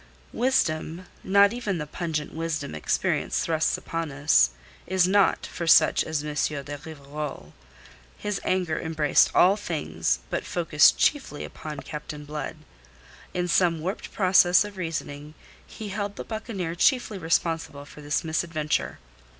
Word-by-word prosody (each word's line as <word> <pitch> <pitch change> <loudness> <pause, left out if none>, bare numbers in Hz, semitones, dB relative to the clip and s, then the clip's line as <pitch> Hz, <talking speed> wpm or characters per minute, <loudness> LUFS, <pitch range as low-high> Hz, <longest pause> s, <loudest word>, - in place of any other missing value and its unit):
Wisdom 175 -8 0 0.2
not 200 +2 +5
even 215 -6 -2
the 150 - -4
pungent 155 -1 -4
wisdom 160 - -3
experience 75 - 0
thrusts 160 -1 +1
upon 165 -2 -4
us 140 - +4 0.4
is 185 -1 +3
not 200 +1 +3
for 170 -2 -5
such - - +6
as 155 -2 -2
M. 150 0 -4
de 145 0 -2
Rivarol. 145 - -7 0.6
His 210 -2 -3
anger 180 -4 0
embraced 155 -2 +3
all 190 +3 +6
things, 150 - -2
but - - -1
focussed 160 -4 +4
chiefly 270 - 0
upon 150 -2 -7
Captain 150 0 -7
Blood. 150 +2 -5 0.8
In 180 0 0
some 170 -2 +2
warped 185 +6 -4
process 185 -1 +5
of 205 -1 -9
reasoning 155 -4 -5 0.3
he 215 -2 -8
held 205 0 -3
the - - -6
buccaneer 215 -6 -4
chiefly 215 +2 +2
responsible 160 -3 -1
for 150 - -13
this 145 0 -1
misadventure. 160 -1 -1
165 Hz, 135 wpm, -26 LUFS, 150-185 Hz, 0.8 s, such